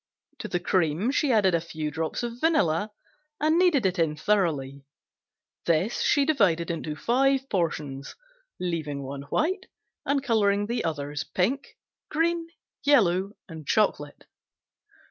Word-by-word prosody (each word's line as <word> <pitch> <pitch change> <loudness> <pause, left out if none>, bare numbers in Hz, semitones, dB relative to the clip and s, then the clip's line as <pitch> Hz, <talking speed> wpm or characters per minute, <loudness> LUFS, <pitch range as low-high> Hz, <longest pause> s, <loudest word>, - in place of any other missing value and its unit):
To - - -5
the 175 - -1
cream 175 - +1
she 285 -1 +1
added 205 -5 +4
a 170 - +2
few 160 -2 -4
drops 160 +8 -3
of 235 0 -4
vanilla 215 - +2 0.5
and 315 +3 +3
kneaded 335 - +3
it 185 -1 +1
in 160 -2 +1
thoroughly. 150 -7 0 0.8
This 170 +7 +1
she 285 -1 +3
divided 185 - +2
into 160 -2 -4
five 270 - +2
portions, 150 -7 -2 0.4
leaving 155 -6 -3
one 135 +1 -6
white 370 - 0 0.4
and 280 -1 0
coloring 205 -5 +2
the 235 +3 -2
others 145 -1 -3
pink, 250 +10 -2 0.3
green, 330 +1 0 0.4
yellow 200 -9 +3
and 160 -5 -10
chocolate. 150 -9 0
185 Hz, 130 wpm, -26 LUFS, 155-265 Hz, 0.8 s, added